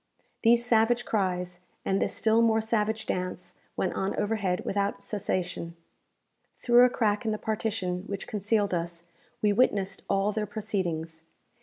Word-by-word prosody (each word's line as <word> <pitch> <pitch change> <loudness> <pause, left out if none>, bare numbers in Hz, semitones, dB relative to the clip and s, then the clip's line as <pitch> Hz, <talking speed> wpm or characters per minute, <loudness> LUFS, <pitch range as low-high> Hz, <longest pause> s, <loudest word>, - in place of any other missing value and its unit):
These 235 +1 +4
savage 240 +1 +3
cries, 180 -4 -1 0.3
and 195 0 +1
this - - 0
still 225 +1 +3
more 225 -1 +4
savage 220 0 0
dance, 180 -1 -4 0.2
went 185 - 0
on 195 +1 -1
overhead 205 -4 -1
without 200 0 -1
cessation. 180 -4 -3 0.8
Through 245 0 +6
a - - +4
crack 210 -4 0
in 220 - 0
the 215 - -1
partition 210 -4 -2
which 200 -1 -4
concealed 205 -1 0
us, 170 0 -2 0.4
we 205 -1 +4
witnessed 200 -4 +1
all 195 +1 +2
their 210 0 -2
proceedings. 175 -7 -3
205 Hz, 145 wpm, -28 LUFS, 185-220 Hz, 0.8 s, Through